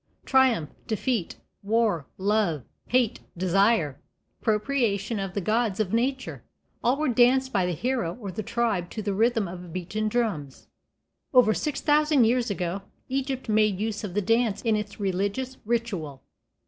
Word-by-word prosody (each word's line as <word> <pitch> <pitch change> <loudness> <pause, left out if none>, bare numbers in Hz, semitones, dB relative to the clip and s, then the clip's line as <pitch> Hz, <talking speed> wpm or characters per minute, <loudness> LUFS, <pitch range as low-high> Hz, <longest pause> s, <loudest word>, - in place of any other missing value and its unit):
Triumph, 255 - +3 0.2
defeat, 220 -3 -1 0.3
war, 205 - +1
love, 195 - +1 0.2
hate, 245 -3 +2 0.2
desire, 185 - +2 0.4
propitiation 215 -2 0
of 195 -2 -4
the 200 - 0
gods 215 +1 0
of 210 -2 0
nature, 260 +3 -1 0.4
all 250 +3 +3
were 310 - 0
danced 255 +2 +3
by 190 -4 +2
the 180 - -1
hero 235 - -1
or 200 -5 -5
the 215 - -4
tribe 220 -5 -1
to 215 - -5
the 200 -1 -1
rhythm 225 0 +2
of 175 0 -8
beaten 185 +5 -2
drums. 200 - -2 0.7
Over 235 -4 +6
six 300 +3 -2
thousand 300 -3 +4
years 240 +1 +2
ago 185 -1 -2 0.3
Egypt 265 0 -2
made 215 -3 +2
use 220 0 -2
of 195 -3 -5
the 205 - +1
dance 225 0 +1
in 225 -2 +2
its 210 -1 -4
religious 200 +7 -2
ritual. 200 - -2
215 Hz, 150 wpm, -26 LUFS, 190-240 Hz, 0.7 s, Over